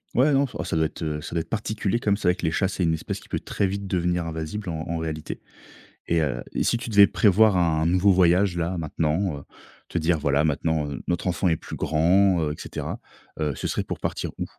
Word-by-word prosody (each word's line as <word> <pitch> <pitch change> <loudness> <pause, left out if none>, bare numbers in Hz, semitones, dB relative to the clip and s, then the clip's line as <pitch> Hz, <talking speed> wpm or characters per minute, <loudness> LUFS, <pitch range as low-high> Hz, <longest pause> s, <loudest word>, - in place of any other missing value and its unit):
Ouais, 135 +5 +4
non, 135 -1 +4
enfin 85 - -4
ça 85 - -3
doit 80 0 +2
être, 80 - -6
heu, 75 -2 -2
ça - - -8
doit 85 - 0
être - - -11
particulier 110 -1 -1
comme 100 -3 +1
c'est 100 - -2
vrai 90 - +4
que - - -5
les 80 - +1
chats, 95 - +1
c'est 95 -1 -2
une 80 -1 +2
espèce 80 - -4
qui - - -18
peut - - -1
très - - -1
vite 100 +1 -3
devenir 90 -2 0
invasive, 80 +5 -4
en 80 -2 -3
en 85 - -2
réalité 80 -1 -5 0.7
et 85 -1 +2
heu, 65 -5 -1
et - - +1
si 120 - +2
tu 115 - -6
devais 100 -2 +8
prévoir 105 0 +4
un 80 -3 +2
nouveau 90 +4 +4
voyage 90 +1 +3
là 85 +2 -1
maintenant, 80 +1 -1
heu, 70 - -10 0.4
te 85 - -2
dire 80 +1 +2
voilà 70 -1 +1
maintenant, 80 0 0
heu, 70 - -5
notre 85 +1 -1
enfant 90 +1 +1
est 80 -2 +2
plus - - -8
grand, 90 +3 +3
heu, 75 -1 -1
et - - -9
cetera, - - -5 0.4
heu, 75 -2 0
ce - - -4
serait - - -1
pour - - -5
partir - - -3
où? - - -1
85 Hz, 250 wpm, -25 LUFS, 80-95 Hz, 0.7 s, devais